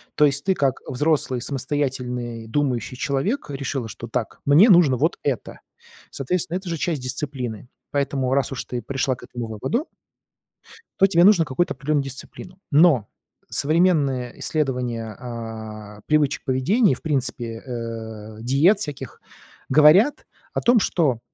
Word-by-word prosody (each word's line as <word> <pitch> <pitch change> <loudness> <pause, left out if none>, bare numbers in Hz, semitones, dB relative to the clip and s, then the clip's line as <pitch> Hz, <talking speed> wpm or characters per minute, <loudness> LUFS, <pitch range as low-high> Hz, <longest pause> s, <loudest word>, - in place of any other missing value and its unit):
То 150 - +5
есть 140 -1 +1
ты 190 -1 +1
как, 135 -5 0
э, - - -9
взрослый, 135 -1 +1
самостоятельный, 125 -4 -3
думающий 125 0 -1
человек, 140 - -1
решила, 135 -3 -3
что 110 - -8
так: - - -3
"Мне 155 +11 +6
нужно 170 -9 +6
вот - - 0
это". - - -3 0.5
Соответственно, 170 +5 -2
это 190 0 -9
же 165 - -2
часть 155 -3 -2
дисциплины. 125 -3 -5 0.2
Поэтому 140 -2 0
раз 140 0 +1
уж 135 - -4
ты 125 -1 -4
пришла 130 +2 -1
к - - -16
этому 120 -1 -6
выводу 110 - -2 1.2
то 195 - +8
тебе 175 -3 +4
нужно 185 -5 +6
какую-то 175 +7 0
определённую 145 -1 0
дисциплину. 135 +7 -10
Но 145 - +5 0.4
современные 145 -6 +1
исследования, 125 -7 -2
а, 110 -3 -8
привычек 150 -2 +1
поведения 170 - +2
и, - - +2
в - - -13
принципе, 120 -6 -3
э, 110 -3 -7
диет 145 - +4
всяких 145 -8 -6 0.5
говорят 155 - +5 0.3
о - - -1
том, 240 0 +4
что 150 - +1
135 Hz, 145 wpm, -23 LUFS, 120-155 Hz, 1.2 s, то